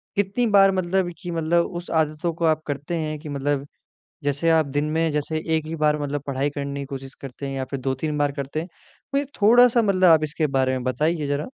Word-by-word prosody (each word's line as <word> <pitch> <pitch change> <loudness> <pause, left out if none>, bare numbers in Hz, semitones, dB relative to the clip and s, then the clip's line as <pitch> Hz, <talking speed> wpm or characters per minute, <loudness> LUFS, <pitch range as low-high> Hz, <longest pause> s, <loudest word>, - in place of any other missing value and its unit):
कितनी 205 +5 +1
बार 195 -2 +6
मतलब 185 0 0
कि 175 -2 -5
मतलब 170 +1 +1
उस 175 -1 -7
आदतों 160 +1 0
को 165 +1 -2
आप 155 -1 +2
करते 145 +3 -3
हैं 155 -1 -3
कि 150 0 -9
मतलब 145 0 -1 0.6
जैसे 145 +4 0
आप 160 -2 +4
दिन 145 +2 -1
में 160 +1 +1
जैसे 150 +1 -2 0.2
एक 155 -1 -1
ही 160 - -4
बार 150 -1 +2
मतलब 145 -1 -2
पढ़ाई 140 +1 0
करने 140 -1 -5
की 140 - -4
कोशिश 135 -1 -8
करते 135 +1 -7
हैं 135 - -4
या 130 -1 -2
फिर 140 - -3
2-3 135 +4 -2
बार 145 -1 +1
करते 140 +2 -4
हैं। 170 - -7 0.5
मुझे 280 - +1 0.2
थोड़ा-सा 240 +2 +6
मतलब 195 -3 +1
आप 160 -1 +6
इसके 155 +1 -1
बारे 130 -2 +1
में 130 -1 -3
बताइए 150 +4 0
ज़रा? 145 +1 -1
155 Hz, 225 wpm, -23 LUFS, 140-170 Hz, 0.6 s, बार